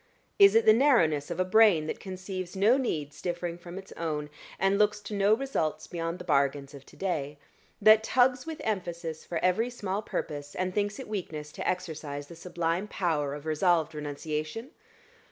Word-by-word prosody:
Is 400 0 +8
it 225 - +5
the 215 - +8
narrowness 180 - +3
of 170 0 -4
a 185 - +2
brain 185 -5 +5
that - - -4
conceives 185 -1 -6
no 205 +6 +4
needs 150 - -3
differing 175 -1 -3
from 175 +1 -9
its 195 0 -10
own, 150 -3 -4 0.3
and 195 +2 +2
looks 210 0 +3
to 210 - -7
no 200 +1 +4
results 230 - -2
beyond 165 0 -4
the 180 - -9
bargains 140 -3 +1
of 140 -1 -12
to - - -16
day; 150 -7 -3 0.4
that 215 +1 +7
tugs 255 +4 +2
with 320 -1 -6
emphasis 170 -6 -3
for 170 - -3
every 220 +7 +2
small 205 -5 -3
purpose, 145 -7 -5
and 185 0 -2
thinks 205 0 -1
it - - -7
weakness 160 -8 -5
to - - -3
exercise 155 -5 -4
the 170 - -10
sublime 170 +2 -2
power 150 -8 -1
of 145 +1 -10
resolved 160 0 +2
renunciation? 155 - -4
175 Hz, 180 wpm, -28 LUFS, 155-205 Hz, 0.4 s, Is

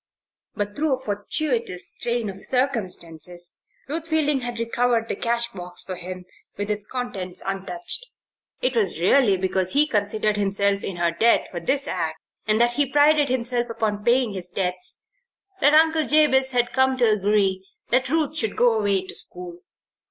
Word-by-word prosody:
But 205 -1 -3
through 300 -2 +1
a - - -13
fortuitous 225 - -2
train 235 -2 -1
of 195 -1 -6
circumstances 180 - -1 0.3
Ruth 320 +3 -3
Fielding 300 -3 +1
had 240 -1 -3
recovered 230 0 0
the - - -2
cash 235 0 0
box 180 -1 -5
for 185 - -6
him, 180 +1 -7 0.3
with 205 +1 -2
its 210 0 -3
contents 190 -8 -4
untouched. 195 - -4 0.5
It 255 0 0
was 195 -8 +2
really 200 +2 +4
because 185 0 0
he 290 +2 +4
considered 210 -4 0
himself 200 0 +1
in 195 - -4
her 170 -1 +1
debt 225 +8 +2
for 175 - -4
this 270 +11 +1
act, 160 -3 -2 0.3
and 215 +1 +2
that 240 0 +4
he 285 +2 +1
prided 295 0 +4
himself 245 -1 -1
upon 210 -2 -2
paying 240 -1 +2
his 180 -2 +1
debts, 180 -1 -3 0.6
that 290 - +5 0.4
Jabez 275 -3 +4
Potter 245 -2 +2
had 240 - -15
come 265 0 +2
to 245 -2 +3
agree 200 -2 +1 0.3
that 255 +1 +2
Ruth 310 0 0
should 220 -8 -1
go 245 -1 +4
away 200 -2 +1
to - - -7
school. 175 -1 -2
215 Hz, 165 wpm, -23 LUFS, 190-260 Hz, 0.6 s, that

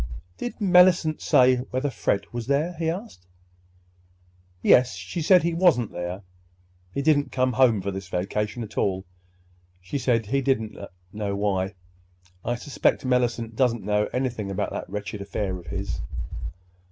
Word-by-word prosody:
"Did 245 - -4
Mellicent 180 -5 +5
say—whether 130 +2 +3
Fred 105 -3 0
was 120 -1 -4
there?" 150 +6 +1
he 165 -1 +1
asked. 175 - -6 1.4
"Yes. 125 0 +5
She 175 - -5
said 180 +2 +5
he 170 0 +1
wasn't 165 - +3
there. 90 +3 -5 0.7
He 140 - -2
didn't 145 -3 +3
come 130 -1 +1
home 120 -7 +4
for 100 - -2
this 95 0 -6
vacation 105 +5 -2
at 105 - -5
all. 95 -1 0 0.7
She 90 +10 -4
said 115 -4 +1
she 135 +6 0
didn't 110 -6 0 0.4
know 105 -2 -2
why. 100 -1 -1 0.7
I 120 - -1
suspect 135 +2 0
Mellicent 120 -3 0
doesn't 120 -2 +1
know 105 +1 +1
anything 125 -6 -2
about 95 - -2
that - - -5
wretched 105 +1 -5
affair 100 -1 -3
of 85 - -15
his." - - -4
120 Hz, 145 wpm, -25 LUFS, 100-140 Hz, 1.4 s, Mellicent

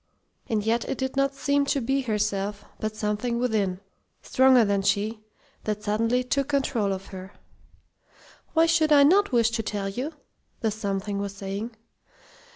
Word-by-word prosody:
And 215 -2 0
yet 230 +1 +1
it - - -2
did 265 0 -3
not 275 0 +1
seem 280 +1 +1
to 280 - +1
be 270 +3 0
herself, 205 -3 -2
but 215 0 -3
something 215 +3 -1
within, 210 -6 0 0.4
stronger 260 -3 +5
than 200 -1 +1
she, 210 +3 0 0.5
that 210 -1 -2
suddenly 230 +4 +1
took 275 +2 0
control 265 -7 0
of 190 0 -4
her. 190 +1 -8 1.2
"Why 325 0 +5
should 325 -2 +3
I 285 -1 +8
not 390 +6 +4
wish 235 -2 +3
to 230 -1 -1
tell 205 -2 -3
you?" 255 +10 -4 0.5
the 220 -2 +1
Something 200 -1 -3
was 200 0 -4
saying. 200 +4 -5
225 Hz, 160 wpm, -26 LUFS, 205-265 Hz, 1.2 s, I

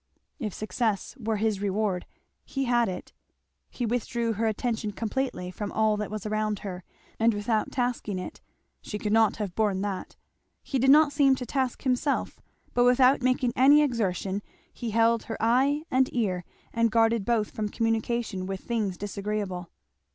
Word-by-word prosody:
If 220 -6 -3
success 215 +2 -2
were 220 -1 -1
his 210 -1 0
reward 200 -2 -1 0.4
he 270 - -3
had 240 -3 +2
it. 180 - -7 0.6
He 245 - -3
withdrew 235 0 -1
her 225 +2 0
attention 220 -1 -2
completely 225 -4 -2
from 205 +2 -5
all 220 -1 +2
that 210 -1 -3
was 215 0 -5
around 215 0 0
her, 185 -2 -5 0.4
and 225 -1 +3
without 215 +1 0
tasking 245 -5 -1
it; 185 - -7 0.4
she 210 - -5
could 210 0 -2
not 225 -1 +4
have 205 -5 -4
borne 205 -3 +1
that. 200 -2 -4 0.5
He 270 - -1
did 265 +2 +3
not 295 +1 +6
seem 275 -2 +4
to 255 - -5
task 260 0 -2
himself; 260 +2 0 0.3
but 245 - +3
without 255 +2 +5
making 255 -1 +1
any 285 +4 +6
exertion 200 -6 -1 0.3
he 235 - -5
held 230 +1 +3
her 225 - -5
eye 265 +6 +2
and 260 0 +3
ear 190 -7 -1 0.3
and 230 0 +3
guarded 225 -1 +3
both 220 -1 0
from 210 -1 -3
communication 225 -3 -1
with 195 0 -4
things 215 -6 -2
disagreeable. 200 -3 -4
225 Hz, 165 wpm, -27 LUFS, 205-245 Hz, 0.6 s, not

